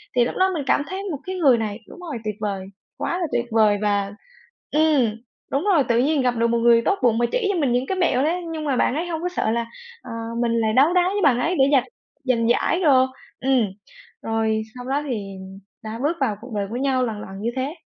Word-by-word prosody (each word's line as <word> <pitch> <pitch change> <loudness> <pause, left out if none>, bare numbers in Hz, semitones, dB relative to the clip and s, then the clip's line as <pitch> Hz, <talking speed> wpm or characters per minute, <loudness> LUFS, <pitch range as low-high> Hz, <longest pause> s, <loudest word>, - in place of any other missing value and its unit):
Thì 240 - +4
lúc - - -4
đó 380 0 +4
mình 300 -4 -2
cảm - - +3
thấy 385 +1 -5
một 290 - -3
cái 375 0 -4
người 275 -9 +4
này 215 0 -3
đúng - - -12
rồi, 315 -8 -5
tuyệt 215 -1 -3
vời, 200 -3 -3 0.3
quá 350 - -2
là 340 - -1
tuyệt 240 - 0
vời 215 -2 +4
và 200 -1 0 0.6
ừm, 290 -8 +3 0.4
đúng 275 +5 0
rồi, 345 -9 +4
tự 235 0 +3
nhiên 285 +2 +2
gặp 250 -1 +1
được 230 0 +2
một 235 0 +1
người 230 0 +5
tốt 395 +10 0
bụng 230 -2 +4
mà 240 - +2
chỉ 480 -5 0
cho 350 - -1
mình 270 -5 +1
những 250 +2 +1
cái 380 - -2
mẹo 275 -7 +2
đấy. 345 +4 0
Nhưng 310 -1 -4
mà 275 - +1
bạn 260 - +2
ấy 340 +3 -2
hông 325 -1 -3
có 360 - -1
sợ 220 -10 -1
là, 235 0 -1 0.4
ờ, - - -9 0.3
mình 235 -1 +1
lại 220 -1 +1
đấu 290 +8 +5
đá 360 - +5
với 410 - -1
bạn 250 -4 +4
ấy 350 +7 0
để 270 - +6
giành 265 -3 +4 0.4
giành 235 -3 +1
giải 340 +8 +2
đồ. 265 -5 +5 0.3
Ừm, 265 -1 +2 0.6
rồi 220 -1 0
sau 250 0 -8
đó 275 +3 -1
thì 200 -5 -4 0.5
đã 220 +1 -6
bước 330 +4 0
vào 220 -6 +1
cuộc 245 -1 -10
đời 200 -1 -1
của 230 - -5
nhau 260 0 +1
lần 215 -2 -4
lần 195 0 -9
như 230 - 0
thế. 270 +5 -2
255 Hz, 250 wpm, -22 LUFS, 225-310 Hz, 0.6 s, để